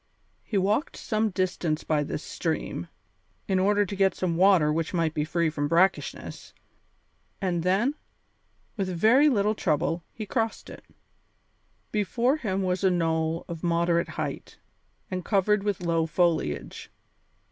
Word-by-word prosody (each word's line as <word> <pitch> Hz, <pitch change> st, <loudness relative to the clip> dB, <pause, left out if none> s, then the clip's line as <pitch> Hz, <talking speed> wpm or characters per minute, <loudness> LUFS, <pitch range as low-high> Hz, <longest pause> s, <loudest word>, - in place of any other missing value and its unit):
He 210 Hz, -, -3 dB
walked 205 Hz, -, 0 dB
some 220 Hz, 0 st, 0 dB
distance 180 Hz, -4 st, -1 dB
by 150 Hz, -2 st, +1 dB
this 150 Hz, -, -5 dB
stream, 160 Hz, -, -3 dB, 0.6 s
in 190 Hz, -1 st, +2 dB
order 205 Hz, +2 st, +3 dB
to 200 Hz, -, -5 dB
get 195 Hz, 0 st, +2 dB
some 175 Hz, -3 st, -1 dB
water 175 Hz, -4 st, +4 dB
which 165 Hz, +3 st, -2 dB
might 165 Hz, -2 st, +1 dB
be 150 Hz, -, 0 dB
free 165 Hz, 0 st, 0 dB
from 145 Hz, -2 st, -1 dB
brackishness, 180 Hz, +4 st, 0 dB, 0.9 s
and 180 Hz, -4 st, -1 dB
then, 195 Hz, -, +2 dB, 0.8 s
with 195 Hz, -2 st, -1 dB
very 225 Hz, -, +4 dB
little 210 Hz, -4 st, +2 dB
trouble, 165 Hz, -2 st, 0 dB
he 215 Hz, -, -6 dB
crossed 225 Hz, +1 st, -2 dB
it. -, -, -11 dB, 1.1 s
Before 235 Hz, +6 st, +1 dB
him 195 Hz, -8 st, -2 dB
was 185 Hz, 0 st, -1 dB
a 190 Hz, -, +5 dB
knoll 165 Hz, -2 st, 0 dB
of 165 Hz, -2 st, -6 dB
moderate 170 Hz, 0 st, +1 dB
height, -, -, -5 dB, 0.5 s
and 185 Hz, -1 st, -3 dB
covered 210 Hz, +1 st, +2 dB
with 200 Hz, -3 st, -2 dB
low 165 Hz, -1 st, +1 dB
foliage. 155 Hz, -, -1 dB
180 Hz, 140 wpm, -26 LUFS, 165-205 Hz, 1.1 s, a